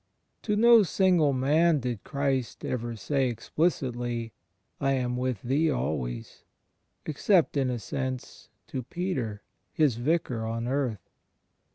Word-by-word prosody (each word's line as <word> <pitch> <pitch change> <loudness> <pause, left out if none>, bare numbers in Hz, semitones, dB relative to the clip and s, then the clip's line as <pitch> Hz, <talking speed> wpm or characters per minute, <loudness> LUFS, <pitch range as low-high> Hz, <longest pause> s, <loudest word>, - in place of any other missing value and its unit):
To 210 - 0
no 235 +1 +7
single 180 -5 +3
man 150 +5 +3
did 120 -4 -3
Christ 135 -4 -2
ever 120 -2 -3
say 135 +3 0
explicitly 120 -3 -1 0.5
"I 135 0 +2
am 125 -2 -1
with 125 -4 -2
thee 145 +6 +2
always," 65 - -3 0.6
except, 165 +3 +2
in 135 -2 +1
a 125 - -1
sense, 130 +3 -5 0.2
to 130 - -4
Peter, 130 - -3 0.3
His 145 -7 +2
Vicar 125 -3 0
on 115 +1 -3
earth. 125 -8 -2
130 Hz, 125 wpm, -28 LUFS, 120-155 Hz, 0.6 s, no